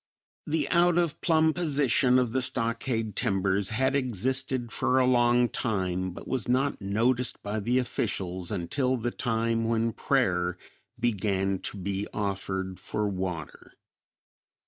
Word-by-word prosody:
The 150 Hz, -1 st, 0 dB
out 175 Hz, 0 st, +4 dB
of 170 Hz, -3 st, 0 dB
plumb 160 Hz, -1 st, +3 dB
position 140 Hz, -6 st, +3 dB
of 125 Hz, -3 st, +1 dB
the 130 Hz, -, 0 dB
stockade 115 Hz, -3 st, -2 dB
timbers 95 Hz, 0 st, +1 dB
had 130 Hz, +4 st, +1 dB
existed 130 Hz, 0 st, 0 dB
for 130 Hz, -, +1 dB
a 130 Hz, -, +4 dB
long 120 Hz, -1 st, +4 dB
time, 95 Hz, -6 st, -2 dB
but 90 Hz, -, -10 dB
was 125 Hz, -6 st, -1 dB
not 130 Hz, +2 st, +1 dB
noticed 120 Hz, +6 st, 0 dB
by 105 Hz, +2 st, -2 dB
the 120 Hz, +5 st, +1 dB
officials 95 Hz, -7 st, -2 dB
until 125 Hz, +8 st, 0 dB
the 120 Hz, +1 st, -2 dB
time 115 Hz, -1 st, 0 dB
when 115 Hz, 0 st, +1 dB
prayer 90 Hz, -11 st, +1 dB, 0.4 s
began 100 Hz, -4 st, 0 dB
to -, -, -4 dB
be 100 Hz, +1 st, -3 dB
offered 95 Hz, -2 st, -3 dB
for 105 Hz, +2 st, -2 dB
water. 90 Hz, -7 st, -5 dB
115 Hz, 135 wpm, -28 LUFS, 95-130 Hz, 0.4 s, out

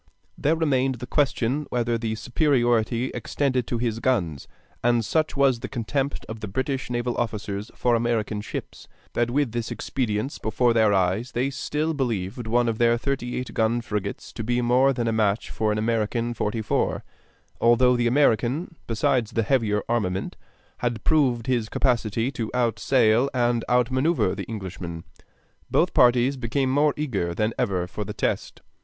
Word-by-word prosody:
There 155 Hz, +3 st, +1 dB
remained 135 Hz, -5 st, +1 dB
the 120 Hz, +1 st, -7 dB
question 140 Hz, 0 st, 0 dB
whether 120 Hz, -1 st, 0 dB
the 115 Hz, -1 st, -2 dB
superiority 120 Hz, -1 st, +1 dB
extended 130 Hz, -4 st, -1 dB
to 120 Hz, -, -1 dB
his 115 Hz, -1 st, -1 dB
guns; 90 Hz, -, 0 dB, 0.4 s
and 120 Hz, -2 st, +2 dB
such 155 Hz, +1 st, 0 dB
was 135 Hz, -4 st, +3 dB
the -, -, -6 dB
contempt 135 Hz, +4 st, -2 dB
of 110 Hz, 0 st, -7 dB
the 105 Hz, -, -5 dB
British 130 Hz, +6 st, -2 dB
naval 120 Hz, 0 st, -1 dB
officers 105 Hz, -3 st, -3 dB
for 120 Hz, -, +1 dB
American 115 Hz, -3 st, 0 dB
ships, 105 Hz, -, -7 dB, 0.3 s
that 120 Hz, 0 st, +1 dB
with 135 Hz, -1 st, +1 dB
this 115 Hz, 0 st, -3 dB
expedience 115 Hz, 0 st, -2 dB
before 115 Hz, +2 st, +1 dB
their 110 Hz, -2 st, +4 dB
eyes 95 Hz, +6 st, +1 dB
they 130 Hz, +3 st, 0 dB
still 150 Hz, +4 st, -2 dB
believed 115 Hz, -4 st, -2 dB
one 120 Hz, +2 st, +2 dB
of 115 Hz, -1 st, -1 dB
their 120 Hz, 0 st, +4 dB
thirty 125 Hz, -1 st, -2 dB
eight 125 Hz, -, -5 dB
gun 115 Hz, +1 st, +1 dB
frigates 105 Hz, -4 st, -4 dB
to -, -, -5 dB
be 120 Hz, +2 st, 0 dB
more 125 Hz, +3 st, +4 dB
than 120 Hz, -3 st, -1 dB
a -, -, +2 dB
match 110 Hz, -1 st, 0 dB
for 110 Hz, -1 st, 0 dB
an 105 Hz, -, 0 dB
American 115 Hz, +1 st, 0 dB
forty 110 Hz, 0 st, -2 dB
four, -, -, 0 dB, 0.6 s
although 125 Hz, +2 st, +4 dB
the 120 Hz, -1 st, +1 dB
American, 135 Hz, -, +2 dB
besides 115 Hz, 0 st, +1 dB
the 115 Hz, -, +1 dB
heavier 105 Hz, -4 st, +1 dB
armament, 95 Hz, -5 st, -1 dB, 0.4 s
had 120 Hz, -3 st, -2 dB
proved 130 Hz, -7 st, +2 dB
his 120 Hz, -4 st, 0 dB
capacity 120 Hz, -1 st, 0 dB
to 115 Hz, -5 st, -4 dB
outsail 120 Hz, +1 st, +3 dB
and 120 Hz, -2 st, +1 dB
out 125 Hz, +1 st, +3 dB
manoeuvre 130 Hz, -, +2 dB
the -, -, -5 dB
Englishman. 95 Hz, -6 st, -6 dB, 0.7 s
Both -, -, +2 dB
parties 125 Hz, +2 st, +4 dB
became 130 Hz, +2 st, 0 dB
more 145 Hz, +2 st, +3 dB
eager 100 Hz, -, -2 dB
than 110 Hz, +3 st, 0 dB
ever 95 Hz, -7 st, 0 dB
for 100 Hz, +4 st, -5 dB
the -, -, -6 dB
test. -, -, -2 dB
120 Hz, 165 wpm, -24 LUFS, 110-130 Hz, 0.7 s, their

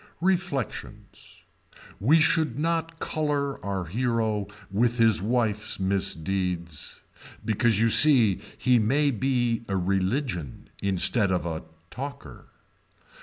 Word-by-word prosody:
Reflections. 180 Hz, -, -4 dB, 0.6 s
We 145 Hz, +11 st, +4 dB
should 155 Hz, -4 st, +2 dB
not 165 Hz, +1 st, -2 dB
color 145 Hz, -4 st, -2 dB
our 95 Hz, -3 st, -3 dB
hero 110 Hz, +1 st, -1 dB, 0.2 s
with 120 Hz, +4 st, +1 dB
his 115 Hz, -5 st, +3 dB
wife's 110 Hz, -2 st, -1 dB
misdeeds. 95 Hz, -3 st, -2 dB, 0.4 s
Because 110 Hz, -1 st, +1 dB
you 115 Hz, +1 st, +3 dB
see 120 Hz, -8 st, +6 dB, 0.2 s
he 125 Hz, -2 st, +3 dB
may 140 Hz, +7 st, +2 dB
be 120 Hz, -1 st, 0 dB
a 95 Hz, -, -1 dB
religion 95 Hz, -, -2 dB
instead 100 Hz, +2 st, +2 dB
of 90 Hz, -2 st, -1 dB
a 80 Hz, -1 st, -5 dB, 0.3 s
talker. 140 Hz, +2 st, -8 dB
115 Hz, 105 wpm, -26 LUFS, 95-140 Hz, 0.6 s, see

